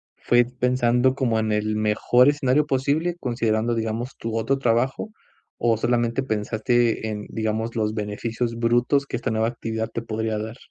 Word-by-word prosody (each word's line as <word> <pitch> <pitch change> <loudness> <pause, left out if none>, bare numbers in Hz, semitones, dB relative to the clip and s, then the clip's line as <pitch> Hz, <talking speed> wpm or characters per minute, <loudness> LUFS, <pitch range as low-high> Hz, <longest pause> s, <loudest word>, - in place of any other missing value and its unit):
¿fue 120 0 +3
pensando 125 0 +1
como 125 -4 0
en 110 0 -1
el 105 0 0
mejor 110 +4 +3
escenario 145 0 +2
posible, 150 +5 0
considerando, 115 -1 0
digamos, 115 +3 -3
tu 115 0 -4
otro 135 +5 +1
trabajo, 130 - 0 0.5
o 115 -1 +2
solamente 120 +2 0
pensaste 110 +1 0
en, 105 -1 -5
digamos, 110 +1 -2
los 110 -1 0
beneficios 115 +3 -3
brutos 120 +4 +2
que 140 - -5
esta 120 - -2
nueva 110 0 +1
actividad 115 -1 -4
te 115 - -2
podría 110 -1 -2
dar? 110 +3 -6
115 Hz, 155 wpm, -23 LUFS, 110-125 Hz, 0.5 s, fue